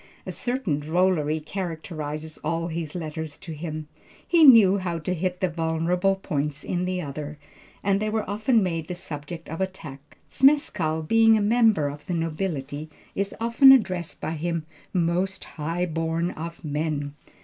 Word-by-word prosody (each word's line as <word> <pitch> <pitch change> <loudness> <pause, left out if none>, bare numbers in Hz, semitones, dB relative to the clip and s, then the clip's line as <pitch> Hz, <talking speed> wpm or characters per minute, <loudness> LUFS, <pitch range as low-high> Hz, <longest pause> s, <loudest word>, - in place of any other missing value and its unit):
A - - -4
certain 245 - -1
drollery 160 -1 +1
characterizes 155 -3 -5
all 165 +2 -2
his 165 -1 -4
letters 160 -3 -5
to 165 - -9
him. 155 -1 -5 0.4
He 340 -2 +5
knew 215 -8 +8
how 175 -3 -2
to 165 +3 -2
hit 180 +1 -2
the 185 - +3
vulnerable 170 +3 +1
points 150 -6 -3
in 180 0 -1
the 185 0 -1
other, 145 +1 -6 0.5
and 195 0 +2
they 215 +1 -1
were 215 0 -1
often 220 +2 +2
made 165 -3 -2
the 180 - -4
subject 165 -1 -7
of 165 +4 -5
attack. 150 -7 -6
Zmeskall 185 - +2
being 225 +1 +6
a - - +1
member 215 -7 +3
of 145 +1 -8
the 180 - -1
nobility, 155 -3 -3 0.2
is 200 0 -2
often 235 +4 +7
addressed 185 -10 +2
by - - -3
him, 165 0 -2 0.3
"Most 180 +2 0
high 165 +3 -3
born 165 +1 -1
of 165 +1 -7
men." 150 -1 -2
170 Hz, 160 wpm, -25 LUFS, 155-190 Hz, 0.5 s, knew